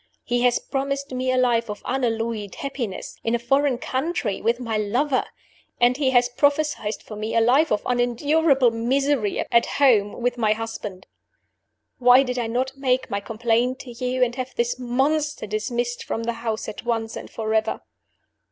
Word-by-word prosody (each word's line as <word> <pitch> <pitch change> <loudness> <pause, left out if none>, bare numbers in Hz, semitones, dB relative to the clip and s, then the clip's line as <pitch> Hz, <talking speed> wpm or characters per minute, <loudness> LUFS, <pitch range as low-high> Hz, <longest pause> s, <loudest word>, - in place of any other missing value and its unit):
He 245 0 0
has 245 -1 +4
promised 275 +1 -3
me 255 0 -1
a 255 - +1
life 235 -3 +2
of 210 - -6
unalloyed 225 -5 -2
happiness, 250 -8 -5
in 230 +1 +1
a - - +2
foreign 270 +2 +1
country 260 - -2
with 235 +2 +1
my 230 -3 -3
lover; 245 +7 +1 0.5
and 245 +1 +4
he 275 -1 +1
has 245 -1 +4
prophesied 285 -4 +1
for 215 - -8
me 215 +2 -4
a - - +5
life 260 +8 +4
of 210 - +1
unendurable 255 +2 +2
misery 245 0 0
at 235 0 +5
home 225 -8 +4
with 245 0 0
my 215 -2 +3
husband. 215 -4 -6 0.9
"Why 250 +1 +7
did 250 -1 -3
I 235 - -1
not 255 +3 -1
make 260 -1 0
my 200 - 0
complaint 235 +4 0
to 250 - -10
you, 250 +2 0
and 240 -1 +1
have 255 0 -5
this 240 +1 -1
monster 275 +3 0
dismissed 240 +3 -2
from 230 - -3
the 235 +1 -1
house 225 -2 -3
at 215 - -7
once 225 -2 -2
and - - -7
forever? 220 0 -1
245 Hz, 170 wpm, -23 LUFS, 225-265 Hz, 0.9 s, Why